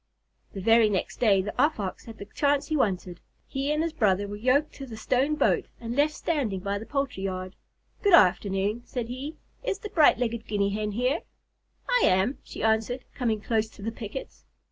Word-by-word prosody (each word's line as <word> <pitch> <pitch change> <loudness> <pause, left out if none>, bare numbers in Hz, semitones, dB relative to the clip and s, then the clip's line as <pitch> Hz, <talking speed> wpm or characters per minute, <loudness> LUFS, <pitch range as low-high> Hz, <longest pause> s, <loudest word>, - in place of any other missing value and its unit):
The 195 - -5
very 225 +1 +5
next 190 -3 -2
day, 200 -5 +4
the 210 - -4
Off 295 -3 +2
Ox 190 -3 -4
had 225 -1 -10
the 200 - -8
chance 285 +7 0
he 310 - +1
wanted. 185 -8 -1 0.3
He 275 +2 -2
and 305 +1 +1
his 330 -1 -2
brother 205 -7 +2
were 205 - -6
yoked 255 +8 +2
to 275 - -7
the 225 -3 -8
stone 265 +6 +1
boat - - +2
and 235 0 -5
left 295 +2 +2
standing 250 - -1
by 200 +1 -2
the 220 - -9
poultry 275 -8 -2
yard. 185 -1 -4 0.5
"Good 400 -4 +7
afternoon," 195 - +3
said 240 -2 -5
he. 270 +5 -6 0.3
"Is 400 - -1
the 420 - -7
bright 310 -6 +5
legged 235 -2 -2
Guinea 200 -1 0
Hen 210 0 -2
here?" 250 +8 +1 0.7
"I - - +3
am," 190 +9 +2
she - - -8
answered, 220 +3 +1
coming 225 -5 -1
close 220 -1 0
to 200 - -13
the 225 - -2
pickets. 225 +3 -8
225 Hz, 200 wpm, -27 LUFS, 200-275 Hz, 0.7 s, Good